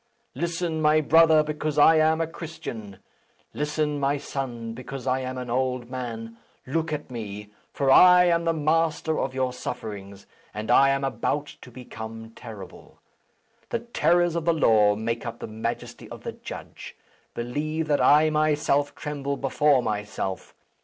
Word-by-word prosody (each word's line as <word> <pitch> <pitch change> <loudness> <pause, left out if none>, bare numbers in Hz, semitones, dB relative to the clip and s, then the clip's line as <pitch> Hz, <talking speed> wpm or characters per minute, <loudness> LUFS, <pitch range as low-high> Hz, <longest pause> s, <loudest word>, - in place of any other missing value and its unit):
Listen, 170 -1 -2
my 155 0 +4
brother, 160 0 +5
because 150 0 -3
I 160 +2 +7
am 160 +1 +3
a - - +1
Christian! 120 - -8 0.6
Listen, 150 0 -1
my 140 +1 +1
son, 120 -5 -5
because 130 +2 -8
I 130 0 +1
am 130 0 -5
an 125 -2 -5
old 125 -1 -1
man! 115 -3 -6 0.3
Look 160 +4 -2
at 150 -3 -5
me; 105 -3 -7 0.2
for 135 -1 +1
I 180 +3 +8
am 170 -1 +2
the 165 - +3
master 160 0 0
of 130 -1 -2
your 130 -1 0
sufferings, 100 -5 -7 0.3
and 105 +1 -3
I 135 - +6
am 135 0 0
about 135 +3 -2
to - - -12
become 115 -2 -9
terrible. 110 -5 -12 0.7
The - - 0
terrors 175 -7 +2
of 170 -2 -2
the 170 - +3
law 105 -8 +4
make 115 +2 -3
up 115 -1 -6
the - - -6
majesty 110 +2 -5
of - - -10
the - - -4
judge. - - -10 0.4
Believe 155 +7 -3
that 145 -1 +2
I 155 +1 +5
myself 150 -2 +1
tremble 140 -2 -4
before 140 -1 +2
myself. 105 -3 -4
135 Hz, 155 wpm, -25 LUFS, 115-155 Hz, 0.7 s, I